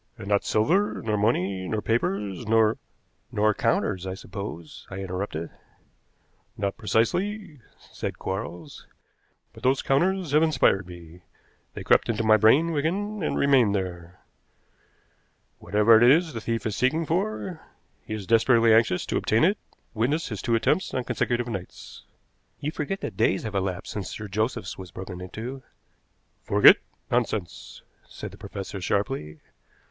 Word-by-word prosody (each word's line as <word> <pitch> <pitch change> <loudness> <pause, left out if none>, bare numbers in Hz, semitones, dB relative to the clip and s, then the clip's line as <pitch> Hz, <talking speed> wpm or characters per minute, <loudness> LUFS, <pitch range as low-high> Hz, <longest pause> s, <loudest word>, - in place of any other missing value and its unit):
"And 95 - -9
not 100 -1 +2
silver, 180 - +1
nor 110 -1 0
money, 100 -3 0
nor 110 +3 -1
papers, 105 -2 -2
nor 110 0 +3 0.2
" - - -44
"Nor 105 +1 +2
counters, 100 -4 0
I 95 - -4
suppose," 95 -5 -8
I 95 - -7
interrupted. 95 -3 -4 1.1
"Not 100 -1 -2
precisely," 155 - -1 0.3
said - - -5
Quarles. 95 -2 -6 0.7
"But - - -14
those 130 +1 +2
counters 175 +4 +1
have 150 +1 +4
inspired 130 - +2
me. 85 -1 -12 0.5
They - - -6
crept - - +3
into 115 0 0
my 110 0 +6
brain, 125 +11 +4
Wigan, 190 +8 -2
and 155 - -1
remained 130 -7 +4
there. 90 -2 -5 1.4
Whatever 105 +2 +4
it 120 - +7
is 160 +2 +3
the 115 - -5
thief 115 -1 -2
is 110 -2 -1
seeking 155 +8 +1
for, 185 0 -2 0.4
he 110 - -5
is 105 -3 -6
desperately 115 +1 +4
anxious 110 -5 +3
to - - -1
obtain 110 +5 +2
it 195 +6 +3 0.3
witness 135 +9 0
his 105 -4 -5
two 115 - +1
attempts 155 +10 +1
on 130 - 0
consecutive 120 0 -1
nights." 95 -6 -8 0.5
"You 150 - -3
forget 160 +6 -4
that 95 - -5
days 95 - +2
have 110 -2 -5
elapsed 95 -1 -3
since 100 -3 -4
Sir 105 - -7
Joseph's 105 -1 -2
was 95 -1 -8
broken 90 +1 -8
into." 115 +8 -7 0.8
"Forget? - - +7 0.3
Nonsense!" 105 - -2 0.2
said - - -8
the - - -13
professor 95 -1 -7
sharply. 95 - -2
110 Hz, 150 wpm, -25 LUFS, 95-135 Hz, 1.4 s, it